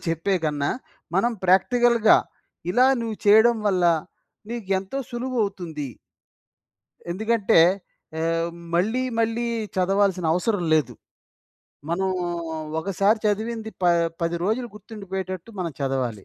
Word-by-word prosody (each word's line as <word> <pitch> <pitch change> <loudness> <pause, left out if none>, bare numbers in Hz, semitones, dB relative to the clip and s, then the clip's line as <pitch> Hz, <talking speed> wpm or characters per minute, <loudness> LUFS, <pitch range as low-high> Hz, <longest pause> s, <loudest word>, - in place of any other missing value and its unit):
చెప్పేకన్నా, 160 -4 0 0.5
మనం 235 +6 +2
ప్రాక్టికల్‌గా 230 +4 +5 0.5
ఇలా 250 +6 +5
నువ్వు 225 -2 -3
చేయడం 220 +3 +6
వల్ల, 185 -3 +2 0.7
నీకు 235 -5 -5
ఎంతో 195 +8 -5
సులువు 250 +1 -3
అవుతుంది. 165 -7 -5 1.2
ఎందుకంటే 220 -1 +2 0.6
ఆహ్, 165 +1 0 0.2
మళ్ళీ, 220 +9 +1 0.2
మళ్ళీ 230 +1 0 0.3
చదవాల్సిన 190 -1 +2
అవసరం 190 +1 0
లేదు. 155 - +1 1.0
మనం 190 +3 0 0.7
ఒకసారి 195 +4 +2
చదివింది 220 +1 -2
ప - - +2 0.4
పది 170 +1 0
రోజులు 235 +4 -1
గుర్తుండిపోయేటట్టు 190 -2 -6
మనం 170 -4 -2
చదవాలి. 130 -7 -2
195 Hz, 100 wpm, -24 LUFS, 175-225 Hz, 1.2 s, చేయడం